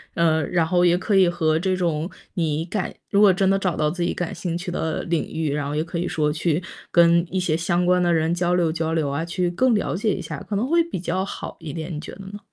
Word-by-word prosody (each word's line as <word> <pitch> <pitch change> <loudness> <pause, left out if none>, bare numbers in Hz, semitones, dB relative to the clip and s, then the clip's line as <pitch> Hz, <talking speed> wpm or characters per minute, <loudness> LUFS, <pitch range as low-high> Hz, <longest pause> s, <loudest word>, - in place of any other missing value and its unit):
嗯， 160 -2 +2
然 170 -3 +2
后 175 +1 +2
也 175 0 +4
可 195 +2 0
以 185 -2 +5
和 160 -2 +1
这 185 +1 0
种 170 -1 -1 0.2
你 160 -3 -1
感 190 +1 -3 0.2
如 200 - +4
果 205 -2 +8
真 190 +1 +1
的 195 0 +3
找 185 -3 0
到 150 0 +1
自 175 +1 -5
己 175 - 0
感 175 -2 -3
兴 170 -2 -3
趣 180 +1 -5
的 160 -2 -2
领 170 -2 -1
域， 155 -3 -1
然 145 -1 -2
后 145 - -3
也 155 - +1
可 170 +1 -5
以 175 - -1
说 150 -1 0
去 165 +2 0 0.3
跟 170 0 +5
一 190 - -1
些 175 -4 0
相 175 +2 0
关 180 0 +3
的 175 - +2
人 160 +1 +1
交 175 0 +1
流 170 -3 +2
交 160 0 -2
流 155 -3 0
啊， 145 +4 -2
去 175 +1 -1
更 250 +6 +2
了 205 - -1
解 205 +1 0
一 - - -5
下， 155 -3 -6
可 210 - -1
能 225 +6 0
会 335 +2 +3
比 335 - -5
较 185 +2 -1
好 200 - -6
一 160 -3 -7
点， 160 +3 -5
你 150 - -4
觉 155 - -8
得 195 - -11
呢？ 205 +1 -8
175 Hz, 295 characters per minute, -23 LUFS, 160-185 Hz, 0.3 s, 果